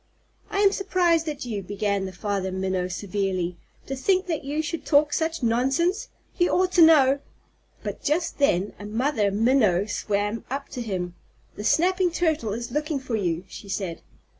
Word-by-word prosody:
"I 400 - 0
am 400 -1 +6
surprised 350 -5 +1
at 295 -2 -5
you," 215 -4 -3
began 200 0 -1
the - - -6
Father 190 0 -2
Minnow 190 -1 -1
severely, 185 -2 -2 0.3
"to 270 - -4
think 370 +8 +1
that 320 -5 -2
you 295 +3 -2
should 330 +2 -4
talk 295 0 +3
such 325 -3 -1
nonsense. 270 - +1 0.3
You 350 - +4
ought 370 0 +2
to 350 - +4
know 285 -4 +6 0.3
" - - -35
But - - -5
just 330 +3 -1
then 205 -8 +2
a 205 - -8
Mother 220 0 +1
Minnow 210 -3 +3
swam 205 +1 -2
up 275 +2 -4
to 250 - -5
him. 185 -6 -3 0.4
"The 210 - -6
Snapping 360 - +3
Turtle 320 -10 0
is 235 +2 -5
looking 300 0 -1
for 260 -3 -3
you," 175 -4 -1
she 200 - -10
said. 190 -4 -3
250 Hz, 175 wpm, -25 LUFS, 200-320 Hz, 0.4 s, am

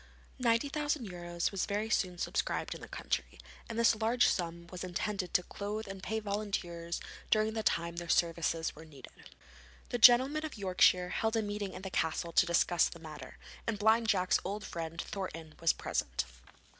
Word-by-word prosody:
£90,000 230 - 0
was 195 -2 -1
very 205 +2 -1
soon 185 -5 0
subscribed - - -1
in - - -10
the - - -8
county, - - -3 0.3
and 230 - -4
this 235 0 +5
large 230 +3 +3
sum 170 -1 -1
was 180 -1 -6
intended 185 +1 -2
to 180 - +3
clothe 210 +3 -5
and 195 -1 -7
pay 220 +3 -2
volunteers 195 -5 -3 0.3
during 215 0 +3
the 220 - -1
time 170 -4 0
their 170 -1 -5
services 165 -1 +1
were 155 - -11
needed. 145 -5 -13 0.8
The 245 - -2
gentlemen 260 +7 +7
of 310 -6 -5
Yorkshire 180 -2 +4
held 220 +4 0
a 225 - +1
meeting 205 -1 -3
in 185 - -8
the 190 - -5
castle 165 +1 -1
to 180 - +4
discuss 170 0 +3
the - - -10
matter, 155 -2 -10 0.3
and 225 -2 0
Blind 220 +2 +4
Jack's 185 -4 +3
old 205 +2 -4
friend, 165 0 -5
Thornton, 165 -5 -5
was 165 - +5
present. - - -2
195 Hz, 170 wpm, -32 LUFS, 170-220 Hz, 0.8 s, gentlemen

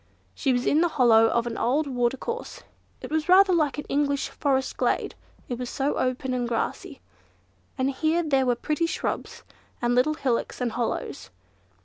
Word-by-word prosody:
She 270 - 0
was 245 0 0
in 305 - +3
the 345 - +4
hollow 225 -3 +6
of 235 +1 0
an 235 -1 -4
old 275 +7 +1
watercourse. 270 - -3 0.4
It - - -8
was 315 +2 -1
rather 380 +1 +6
like 305 -5 +1
an 295 - -5
English 280 0 0
forest 265 -2 -1
glade, - - 0 0.3
it 245 -1 -4
was 250 -1 -4
so 280 +2 -1
open 255 0 -1
and 245 -1 -1
grassy; 230 - -3 0.8
and 260 +1 +1
here 315 +5 +1
and 310 -3 -5
there 265 -1 +3
were 245 - +3
pretty 305 +7 -1
shrubs, - - -4 0.4
and 240 0 +1
little 255 +5 +2
hillocks 260 -6 -2
and 245 -2 -1
hollows. 220 - -3
265 Hz, 175 wpm, -25 LUFS, 245-305 Hz, 0.8 s, hollow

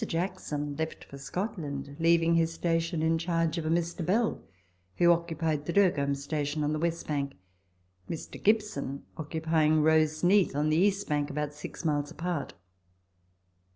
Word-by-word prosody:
Jackson 165 -5 -3
left 160 0 -4
for 140 - -11
Scotland, 140 -4 -4
leaving 165 0 +4
his 165 0 +3
station 165 -1 0
in 165 0 +2
charge 165 0 0
of 155 - -3
a - - 0
Mr. 170 +1 0
Bell, 215 +7 +1 0.6
who 175 0 +6
occupied 160 -3 -1
the 170 - -1
Dergholm 145 -8 +3
Station 145 +1 -2
on 150 +1 0
the 155 - -1
Avestbank, 150 -4 -2 0.8
Mr. 165 - -6
Gibson 205 -11 +1
occupying 160 0 +1
the 155 - +4
Roseneath 160 +4 +3
on 150 +1 +1
the 155 - +2
east 200 +2 +2
bank 145 -1 0
about 150 0 -3
six 150 +3 -8
miles 145 -2 0
apart. 170 -2 -4
160 Hz, 150 wpm, -29 LUFS, 150-170 Hz, 0.8 s, who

